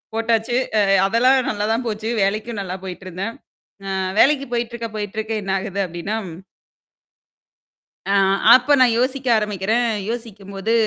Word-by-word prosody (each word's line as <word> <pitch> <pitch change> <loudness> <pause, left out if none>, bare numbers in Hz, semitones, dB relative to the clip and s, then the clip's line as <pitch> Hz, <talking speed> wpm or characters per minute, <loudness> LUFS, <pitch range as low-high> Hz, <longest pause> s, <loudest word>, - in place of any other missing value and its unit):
போட்டாச்சு. 225 +1 0 0.2
அ - - +4 0.2
அதெல்லாம் 255 +5 +3
நல்லா 210 0 -2
தான் 240 +2 -2
போச்சு. 215 0 -3
வேலைக்கும் 215 +3 -2
நல்லா 185 -1 -5
போயிட்டிருந்தேன். 185 +4 -6 0.5
அ - - -3 0.3
வேலைக்கு 275 0 +4
போயிட்டிருக்க 235 -1 -3
போயிட்டிருக்க 220 +2 -4
என்ன 195 - -2
ஆகுது 200 0 -5
அப்படின்னா 175 +6 -4
ம். 165 - -10 1.7
ஆ - - +2 0.4
அப்போ 255 +3 +4
நான் 245 -3 +5
யோசிக்க 260 +1 -1
ஆரம்பிக்கிறேன். 210 +3 0 0.2
யோசிக்கும்போது, 210 -3 -5
220 Hz, 125 wpm, -20 LUFS, 200-240 Hz, 1.7 s, நான்